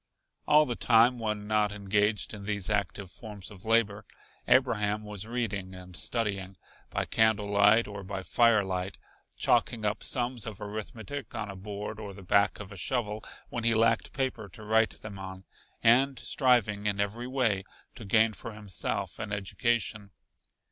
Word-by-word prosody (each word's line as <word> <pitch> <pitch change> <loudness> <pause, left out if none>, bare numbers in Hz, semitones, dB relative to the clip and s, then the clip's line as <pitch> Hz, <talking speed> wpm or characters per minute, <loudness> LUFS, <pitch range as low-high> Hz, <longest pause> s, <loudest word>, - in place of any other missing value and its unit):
All 150 0 +6
the 120 - -2
time 120 +2 +4
when 105 -2 -2
not 105 -1 +2
engaged 105 +1 0
in 100 -2 -8
these 100 -1 -1
active 100 -2 -1
forms 105 -4 -9
of 95 0 -11
labor, 110 -2 +2 0.4
Abraham 105 -5 +2
was 105 0 -5
reading 100 -6 -3
and 90 -1 -10
studying, 100 +1 -1 0.3
by - - -2
candle 110 -2 +3
light 105 +2 +4
or 100 -1 -7
by 95 0 -5
firelight, 95 -5 +2 0.4
chalking 110 -3 +2
up 105 +1 0
sums 120 -3 0
of 110 -2 -6
arithmetic 110 +4 -6
on 105 -3 -3
a - - -9
board 105 +2 -6
or 100 -3 -7
the 100 - -11
back 100 +1 +2
of 100 -1 -8
a 100 - -9
shovel 105 +2 -2 0.3
when 120 - -4
he 115 0 +3
lacked 115 0 +2
paper 125 -6 -2
to 110 +5 -11
write 110 +1 +3
them 100 -3 -7
on, 95 0 -8 0.4
and 130 +4 +5
striving 115 -7 +2
in 100 -1 0
every 110 +5 -2
way 120 -7 +1 0.3
to 120 - -10
gain 110 +2 +3
for 115 +1 -8
himself 105 -3 -3
an - - -5
education. 105 +1 -1
105 Hz, 160 wpm, -29 LUFS, 100-115 Hz, 0.4 s, All